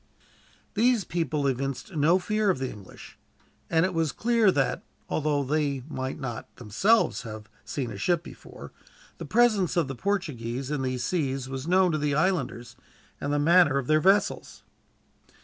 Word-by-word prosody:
These 235 0 +3
people 160 -4 -2
evinced 135 - -3
no 155 +4 +4
fear 210 +2 0
of 185 - +2
the 130 -1 -3
English, 100 -3 -13 0.5
and 165 +1 +3
it 185 - -2
was 165 -2 0
clear 230 -3 +3
that, 135 -6 0 0.3
although 150 -2 0
they 140 -2 -1
might 130 -3 -4
not 120 -4 -6
themselves 190 - +2
have 110 -3 -9 0.2
seen 130 -5 -4
a 100 - -7
ship 175 - +1
before, - - -12 0.5
the - - -5
presence 215 -7 +2
of 165 -5 +2
the 135 - -4
Portuguese 135 - -3
in 150 -2 -1
these 130 -1 -2
seas 135 -5 -1
was 135 +2 -6
known 185 0 +4
to 155 - -1
the 145 -1 0
islanders, 145 -8 -1 0.5
and 140 - -2
the 145 - +1
manner 160 -1 +4
of 135 - -1
their 155 +3 +3
vessels. 195 +4 +1
150 Hz, 165 wpm, -26 LUFS, 130-185 Hz, 0.5 s, no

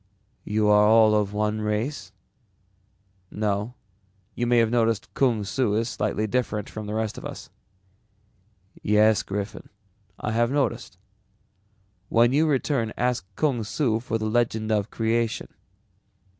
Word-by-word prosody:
"You 105 0 +1
are 105 0 +5
all 110 0 +6
of 105 -2 +1
one 105 +1 -1
race?" 105 0 -2 1.2
"No, 105 +3 -2 0.6
you 120 - -2
may 120 0 +3
have 115 -1 +3
noticed 115 -3 0
Kung 120 -6 +1
Su 105 +1 0
is 115 +2 0
slightly 105 -2 -1
different 110 -2 -1
from 110 -1 -7
the 105 - -4
rest 110 -1 -2
of - - -14
us." - - -8 1.3
"Yes, 105 +1 +4
Griffin, 100 +1 -5 0.5
I - - -3
have 115 +1 +2
noticed. 140 -4 -2 1.1
When 120 +2 +4
you 155 +3 +3
return 130 -5 0
ask 125 -6 -1
Kung 135 -7 0
Su 110 0 0
for 115 -1 -2
the 110 - -4
legend 110 -1 0
of 105 -2 0
creation. 115 0 -1
110 Hz, 135 wpm, -25 LUFS, 105-120 Hz, 1.3 s, all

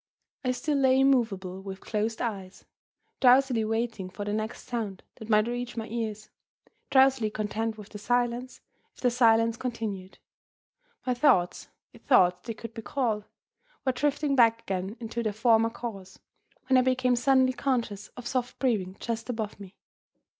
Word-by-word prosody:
I 255 - 0
still 285 +4 0
lay 265 -1 +4
immovable, 215 -9 +1
with 195 -1 -7
closed 220 +1 -2
eyes; 195 -5 -5 0.5
drowsily 255 -2 +5
waiting 225 -3 -2
for 195 +3 -6
the 205 - -2
next 215 +2 -4
sound 215 -6 -4
that 220 - -10
might 215 -1 +4
reach 245 0 -4
my 225 - -2
ears; 215 -2 -4 0.6
drowsily 265 -4 +4
content 215 +1 -3
with 210 -1 -11
the 210 - -9
silence, 245 +3 -1 0.3
if - - -17
the 250 - +3
silence 230 -1 +4
continued. 215 -7 -5 0.9
My 250 - +1
thoughts 235 -9 +2 0.3
(if - - -16
thoughts 180 -7 +3
they 230 - -3
could 230 +1 -9
be 225 - -7
called) 220 -4 -1 0.6
were 260 - +3
drifting 290 +2 0
back 230 -2 +4
again 190 +3 -3
into 235 0 -4
their 215 -2 -1
former 225 +1 +3
course, 200 -5 -8 0.5
when 260 0 +4
I - - +5
became 255 -1 +2
suddenly 260 +1 +3
conscious 235 -7 -2
of 245 - -8
soft 245 0 -2
breathing 200 -8 -1
just 230 0 -4
above 220 -4 -4
me. 195 -1 -11
230 Hz, 160 wpm, -28 LUFS, 210-250 Hz, 0.9 s, drowsily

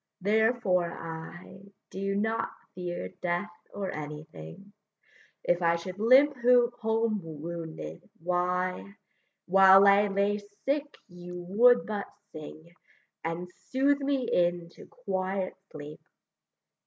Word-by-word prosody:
therefore 205 -4 +2
I 165 +3 -9 0.3
Do 195 +1 -2
not 220 +2 0 0.2
fear 175 - -5
death 175 +2 -1 0.2
or 195 -2 -4
anything; 150 - -9 0.7
If 175 0 +1
I 170 0 +3
should 180 +3 -7
limp 265 +6 +6
home 230 -3 +2
wounded, 160 - -7
why, 180 +3 -1 0.5
While 195 +1 +7
I 200 +1 +6
lay 200 +1 0 0.3
sick 290 +1 -1
you 175 0 -9
would 240 +7 +5
but 210 -2 -4 0.2
sing, 155 +2 -11 0.5
And 165 +2 -3 0.2
soothe 275 +2 +2
me 275 -2 0
into 175 -1 -1
quiet 190 -4 -3 0.2
sleep. 150 0 -9
190 Hz, 105 wpm, -28 LUFS, 170-220 Hz, 0.7 s, While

